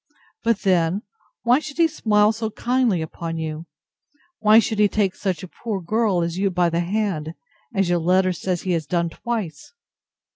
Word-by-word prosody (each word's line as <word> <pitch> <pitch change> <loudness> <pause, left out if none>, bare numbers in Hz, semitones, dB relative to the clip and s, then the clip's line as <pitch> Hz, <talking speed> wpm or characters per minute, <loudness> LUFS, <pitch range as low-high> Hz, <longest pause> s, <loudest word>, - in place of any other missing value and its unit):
But, 230 -3 +1
then, 185 +1 +2 0.4
why 245 +3 +4
should 305 -1 -8
he 335 -1 +5
smile 210 -8 +3
so 220 0 -3
kindly 235 -6 +1
upon 165 +1 -5
you? 160 +1 -5 0.7
Why 215 0 +6
should 220 -1 +2
he 210 - +6
take 200 -2 0
such 185 -5 -3
a - - -6 0.2
poor 220 -4 -1
girl 200 -1 +1
as 170 +2 -3
you 200 0 +2
by 175 -2 +1
the 170 - 0
hand, 175 -4 -2 0.4
as 195 -2 +2
your 175 0 +2
letter 185 +2 +2
says 180 0 -3
he 185 - -1
has 165 -4 -1
done 170 0 0
twice? 200 -12 -5
190 Hz, 180 wpm, -22 LUFS, 170-220 Hz, 0.7 s, Why